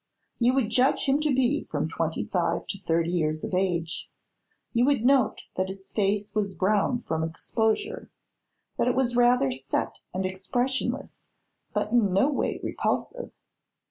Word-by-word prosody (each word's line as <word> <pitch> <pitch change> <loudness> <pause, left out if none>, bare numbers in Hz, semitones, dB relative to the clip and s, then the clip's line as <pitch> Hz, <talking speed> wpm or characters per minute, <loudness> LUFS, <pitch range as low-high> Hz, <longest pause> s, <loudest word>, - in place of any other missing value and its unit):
You 245 +2 +3
would 240 -5 +1
judge 255 +4 +3
him 275 +1 +3
to 305 0 +1
be 265 +3 +1
from - - -2
twenty - - -2
five - - -1
to 195 - -3
thirty 170 -2 0
years 155 -3 0
of - - -4
age; 175 -3 -1 0.6
you 235 - +3
would 275 -4 +2
note 270 -1 +3
that 185 0 +1
his 190 0 -8
face 205 0 0
was 200 -2 -1
browned 215 +5 +1
from 160 -1 -1
exposure, 220 - -1 0.7
that - - +2
it 250 - +2
was 250 -2 +1
rather 245 - +4
set 130 +1 -3
and 185 +1 -2
expressionless 245 +8 -2 0.4
but 210 - -1
in 220 -6 +3
no 230 +10 +3
way 275 - -1
repulsive. - - -2
215 Hz, 155 wpm, -27 LUFS, 185-255 Hz, 0.7 s, rather